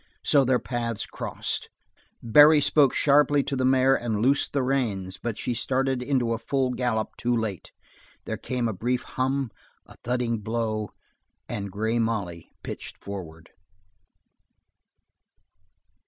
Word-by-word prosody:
So 140 -2 +5
their 130 -1 +3
paths 120 -3 -3
crossed. - - -4 0.5
Barry 150 +7 +7
spoke 145 -2 +4
sharply 145 0 +4
to 140 - -3
the 130 - -1
mare 130 0 +4
and 115 -5 -1
loosed 135 +6 +2
the 140 -2 0
reins, 100 -8 -1
but 115 -3 -3
she 125 - -2
started 130 +2 0
into 125 -3 0
a 115 - -3
full 130 +2 0
gallop 120 -3 -1
too 120 0 +1
late. 105 -6 -4 0.5
There - - -3
came 125 -2 -2
a 110 - -2
brief 120 +6 -1
hum, 130 -1 -2 0.3
a - - -15
thudding 120 -2 -1
blow, 110 -1 -2 0.6
and 100 -1 -4
Grey 110 +4 -1
Molly 100 -8 -3
pitched - - -7
forward. 80 -5 -9
120 Hz, 135 wpm, -26 LUFS, 110-130 Hz, 0.6 s, Barry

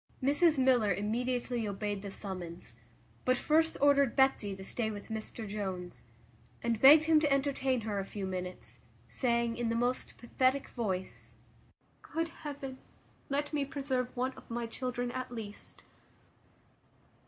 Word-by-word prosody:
Mrs 295 +3 +5
Miller 250 -5 +4
immediately 235 +3 -1
obeyed 205 0 -3
the 200 - -6
summons; 180 -4 -5 0.5
but 255 0 +3
first 320 +4 +2
ordered 280 -2 +4
Betsy 265 -7 +3
to 190 - -9
stay 220 +3 -1
with 205 -2 -7
Mr 220 0 -5
Jones, 190 - -5 0.6
and 230 -2 0
begged 295 +3 +9
him 315 -1 +5
to 300 -2 +1
entertain 270 -2 +1
her 210 -2 -2
a - - -1
few 200 -1 -5
minutes, 180 -10 -4 0.3
saying, 235 - 0
in 240 -1 0
the 230 - 0
most 245 +2 -1
pathetic 260 +3 +1
voice, 180 - -4 0.7
"Good 330 +1 -2
heaven! 280 -4 -7 0.5
let 290 +2 -1
me 290 -2 +1
preserve 270 -3 -2
one 255 +2 0
of - - -15
my 235 0 -2
children 245 +1 -3
at 255 0 -4
least." 215 -3 -8
240 Hz, 140 wpm, -32 LUFS, 205-270 Hz, 0.7 s, begged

